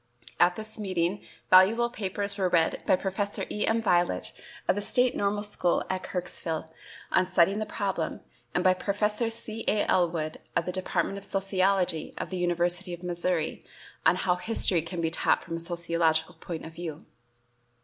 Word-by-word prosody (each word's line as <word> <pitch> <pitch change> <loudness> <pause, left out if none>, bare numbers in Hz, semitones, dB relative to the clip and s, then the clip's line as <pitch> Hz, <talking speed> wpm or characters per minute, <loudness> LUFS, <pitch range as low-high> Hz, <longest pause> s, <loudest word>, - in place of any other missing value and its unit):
At 175 0 +5
this 215 0 -6
meeting 185 -1 -1 0.3
valuable 220 +6 +6
papers 200 -2 -3
were 190 -3 +1
read 165 -2 +2
by - - +6
Professor 195 +2 -2
E. 210 - 0
M. 225 0 +2
Violette, 175 - +2 0.4
of - - +5
the 205 - -2
State 250 +4 +2
Normal 205 +1 0
School 195 -4 +1
at 185 0 -2
Kirksville, 170 -4 -4 0.5
on 185 -1 +3
"Setting 185 +3 +3
the 215 - -3
Problem," 195 -6 -2 0.3
and 180 - +2
by 185 - +6
Professor 210 +4 0
C. 225 -1 -6
A. 210 -1 +3
Ellwood, 165 -3 +1 0.2
of 170 - +1
the 180 - -2
Department 190 +1 -1
of - - -16
Sociology 195 -3 +1
of - - -5
the 185 - -3
University 175 +1 0
of 175 - -18
Missouri, 175 -2 -1 0.4
on - - +5
"How 180 -1 +1
History 185 -4 +2
Can 170 +1 -5
be 165 -1 0
Taught - - +2
from 165 0 -4
a - - -5
Sociological 170 -1 0
Point 165 0 -7
of 160 - -9
View." 160 -2 -7
185 Hz, 170 wpm, -28 LUFS, 170-200 Hz, 0.5 s, valuable